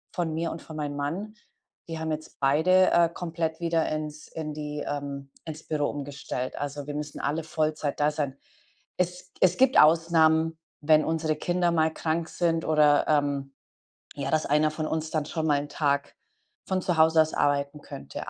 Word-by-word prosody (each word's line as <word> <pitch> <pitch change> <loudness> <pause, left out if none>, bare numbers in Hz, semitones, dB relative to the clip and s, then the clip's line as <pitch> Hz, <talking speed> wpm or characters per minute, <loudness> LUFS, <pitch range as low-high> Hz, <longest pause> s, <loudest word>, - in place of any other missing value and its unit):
von 170 -3 -1
mir 165 +1 -2
und 160 - -7
von 160 - -10
meinem 145 -1 -3
Mann, 175 +10 -3 0.6
die 165 - -4
haben 160 0 -2
jetzt 155 0 -6
beide, 160 +7 +4
äh, 170 -1 +4
komplett 165 -2 -3
wieder 165 -1 0
ins 155 0 -5
in 155 -2 -5
die, 150 0 -5
ähm 140 -1 -5 0.2
ins 160 0 -7
Büro 150 -2 0
umgestellt. 140 -3 -5
Also, 145 0 -5
wir 145 - -4
müssen 150 0 -5
alle 155 +3 -1
Vollzeit 155 -2 -2
da 150 +1 +4
sein. 140 -3 -3 0.6
Es 180 0 -2
es 185 -1 +4
gibt 260 0 +4
Ausnahmen, 160 0 +4 0.2
wenn 155 +1 +5
unsere 160 -1 0
Kinder 175 +2 0
mal 160 -1 +2
krank 165 +1 -2
sind 165 -2 0
oder, 150 -2 +4
ähm 140 -2 0 0.6
ja, 140 -1 -3
dass 155 0 +1
einer 150 +1 +3
von 155 0 -3
uns 160 0 -2
dann 155 -2 -1
schon 160 +1 -2
mal 145 -2 +3
'n 145 - -5
Tag 145 -1 -1 0.5
von 185 -1 0
zu 175 - 0
Hause 160 0 +6
aus 155 - -7
arbeiten 145 0 0
könnte. 70 0 -8
155 Hz, 180 wpm, -27 LUFS, 145-165 Hz, 0.6 s, Hause